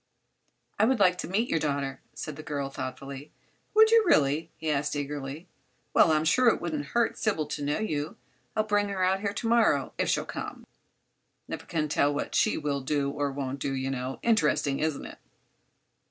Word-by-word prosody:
"I 215 - +6
would 255 0 +2
like 180 -2 +4
to - - -3
meet 215 +6 0
your 165 - +1
daughter," 140 -3 -2
said 155 - -5
the 155 - -8
girl, 140 -2 -3
thoughtfully. 135 +2 -7 0.4
"Would 440 +1 +7
you, 455 -1 +6
really?" 155 - +3
he 160 -1 -2
asked, 145 +1 0
eagerly. 145 +3 -5 0.5
"Well, 160 - +6
I'm 155 0 +2
sure 250 +10 +4
it 230 - +4
wouldn't 300 -2 -3
hurt 235 -1 +2
Sybil 195 -8 0
to 145 0 -4
know 145 +1 0
you. 155 -8 -3 0.4
I'll 215 - +2
bring 205 -1 +1
her 190 -2 -1
out 190 +1 +2
here 200 0 -2
to 225 +3 -3
morrow, 220 - +3
if - - +1
she'll - - +1
come. - - -6 0.8
Never - - -6
can 155 -2 -1
tell 145 -1 +2
what 145 - -3
she 220 - +2
will 145 -2 -1
do 140 +1 0
or 145 0 -1
won't 135 0 -4
do, 135 0 -2
you 135 0 -2
know. 130 0 -3
Interesting, 150 -10 +2
isn't 155 -2 -1
it?" - - -10
150 Hz, 195 wpm, -28 LUFS, 140-205 Hz, 0.8 s, Would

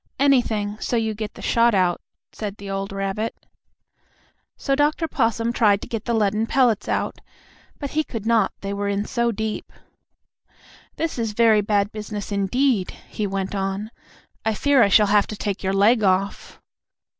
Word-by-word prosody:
"Anything, 225 -7 +2
so - - -2
you 220 -1 0
get 215 0 -6
the - - -11
shot 230 -1 +3
out," 180 -2 +2 0.3
said 210 -2 -6
the 200 -1 -7
old 195 0 -3
rabbit. 195 +3 -3 1.2
So 275 - -1
Dr. 295 +3 +1
Possum 230 -4 0
tried 210 -4 +3
to - - -7
get 225 -3 -4
the 235 - 0
leaden 215 +1 +1
pellets 235 -6 +2
out, - - -2 0.6
but 285 -2 -5
he 310 +1 +1
could 225 -7 -6
not, 230 -1 +3
they 200 0 -3
were 200 0 -2
in 200 +1 -1
so 235 0 0
deep. 220 0 -4 1.2
"This 325 -5 -3
is 225 -2 -1
very 220 -1 +4
bad 205 0 +1
business, 210 -1 -6
indeed," 200 +2 +1 0.2
he 210 - -2
went 195 0 -3
on. 195 +2 -3 0.5
"I 220 -1 0
fear 285 +2 +3
I 205 - +5
shall 210 +2 +6
have 205 0 +3
to 215 - -6
take 200 -1 -3
your 190 - -1
leg 215 +4 +4
off." 195 +1 0
215 Hz, 170 wpm, -23 LUFS, 200-235 Hz, 1.2 s, shall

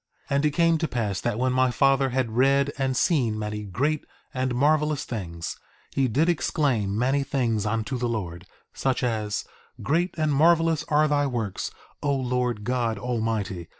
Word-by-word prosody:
1:14 140 - +1
And 140 +2 +2
it - - +3
came 165 +2 +3
to 160 - 0
pass 105 -7 -2
that 120 -3 -1
when 130 +1 +1
my 130 0 +3
father 135 +1 +3
had 125 -2 -1
read 140 +2 +3
and 135 -1 0
seen 125 - +2
many 105 0 -3
great 145 - -1 0.3
and 130 -1 -1
marvelous 150 +2 +2
things, 85 -7 -5 0.3
he 135 -1 +1
did 145 +8 +2
exclaim 135 - 0
many 135 +4 +2
things 120 -6 0
unto 115 +4 -2
the 120 0 -1
Lord; 90 -6 -4 0.3
such 130 -1 -1
as: 110 -4 -1 0.4
Great 170 +5 0
and 155 -2 +1
marvelous 165 +1 +3
are 150 +1 +3
thy 145 -1 +2
works, 115 -7 -3 0.3
O 145 -1 +1
Lord 125 -4 -1
God 120 -2 0
Almighty! 110 -6 -2
130 Hz, 170 wpm, -25 LUFS, 110-145 Hz, 0.4 s, it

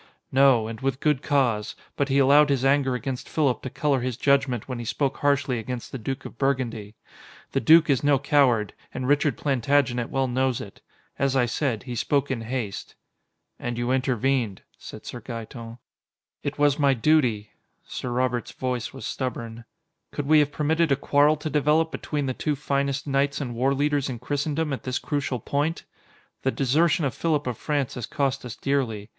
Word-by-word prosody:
"No, 130 -4 +4
and 115 +1 -7
with 135 -1 -1
good 150 -3 +1
cause. 120 -8 0 0.2
But 140 0 0
he 135 - +2
allowed 145 +2 +6
his 135 -2 +1
anger 135 -2 +3
against 130 0 -5
Philip 140 -6 +1
to 130 - -5
color 145 -1 0
his 125 -2 -3
judgment 135 -4 +1
when 125 -2 -4
he - - -4
spoke 135 +4 -1
harshly 140 -4 +1
against 120 +2 -6
the 135 - -5
Duke 135 +4 -5
of - - -10
Burgundy. 120 -6 -1 0.6
The - - +1
Duke 160 +7 +6
is 140 -3 +2
no 145 -1 +4
coward, 130 -6 +2 0.2
and 130 0 -4
Richard 145 -2 +2
Plantagenet 130 -3 +1
well 135 0 0
knows 130 0 0
it. 100 - -10 0.4
As 135 -1 +1
I 130 -2 +3
said, 120 -1 -1
he 125 - -6
spoke 140 +4 0
in 125 -3 -2
haste." 115 -3 -5 0.6
"And 120 -1 -4
you 120 +1 -1
intervened," 130 -4 0
said - - -11
Sir 120 - -7
Gaeton. 115 0 -8 0.6
"It 145 - -4
was 145 0 +3
my 140 -2 +4
duty." 120 -6 +2 0.3
Sir 125 - -5
Robert's 125 -1 -1
voice 125 -3 -3
was 135 - -8
stubborn. 115 -3 -4 0.5
"Could 145 - -4
we 155 +2 +5
have 145 -1 +2
permitted 160 +1 +1
a - - +5
quarrel 145 +2 +3
to 155 - -6
develop 150 +3 +2
between 145 -2 -3
the 130 - -1
two 150 +3 -1
finest 140 -1 -1
knights 140 0 0
and 130 -4 -4
warleaders 140 +3 +1
in 125 - -4
Christendom 145 +4 -2
at 135 - -4
this 130 0 -2
crucial 140 -4 -2
point? 145 +8 -1 0.6
The 130 - +1
desertion 150 +5 +2
of 135 - -1
Philip 155 -3 0
of 125 -2 -2
France 145 0 -2
has 120 - -5
cost 135 -1 -1
us 125 -1 -7
dearly. 120 -8 -2
135 Hz, 185 wpm, -25 LUFS, 120-145 Hz, 0.6 s, allowed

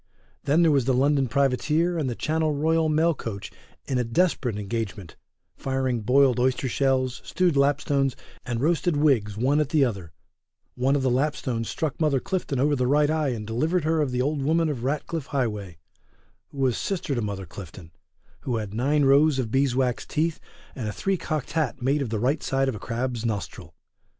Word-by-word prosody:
Then 155 +5 +4
there 165 - +5
was 135 -4 +2
the 130 -1 +2
London 140 +1 +2
privateer 145 +7 +1
and 140 -4 -1
the 120 - -3
Channel 155 +2 0
royal 160 +2 +2
mail 160 +2 +3
coach 110 -8 -6 0.3
in 130 -2 -1
a - - +2
desperate 120 - 0
engagement; 105 -4 -4 0.4
firing 130 -3 -1
boiled 130 +3 +3
oyster 130 +1 +1
shells, 130 -1 0
stewed 180 -4 +1
lapstones, 140 -1 +2 0.3
and 120 -1 -3
roasted 165 +1 +1
wigs 120 -9 +2
one 135 +6 +2
at 150 -2 0
the 150 -3 +3
other, 95 -9 -4 0.6
one 130 +3 +1
of 140 - 0
the 130 - +2
lapstones 125 -4 -1
struck 160 -1 -3
Mother 150 -4 +2
Clifton 160 -5 -2
over 145 +2 +3
the 125 -2 0
right 150 +2 +3
eye 155 -3 +1
and 115 -4 -4
delivered 155 - 0
her 160 0 +1
of 145 - 0
the 125 0 0
old 145 +1 -1
woman 160 +3 +2
of 130 -6 -4
Ratcliffe 145 +2 -2
Highway, 105 - -3 0.7
who - - -15
was 130 -3 +1
sister 180 -7 -2
to 120 - -1
Mother 100 -3 -4
Clifton, 85 -1 -11 0.5
who 125 - -3
had 105 -2 -5
nine 140 +5 +2
rows 140 +1 +5
of 120 -5 -2
bees 135 -1 +2
wax 125 -2 0
teeth 160 +1 -1 0.3
and 120 -5 -5
a - - -2
three 195 - -1
cocked 155 -6 -3
hat 155 -5 -1
made 135 +3 +1
of 130 - -2
the 110 - -1
right 130 +7 +1
side 135 0 0
of 135 - 0
a 105 - -7
crab's 120 0 -3
nostril. 100 -7 -4
135 Hz, 195 wpm, -25 LUFS, 120-150 Hz, 0.7 s, there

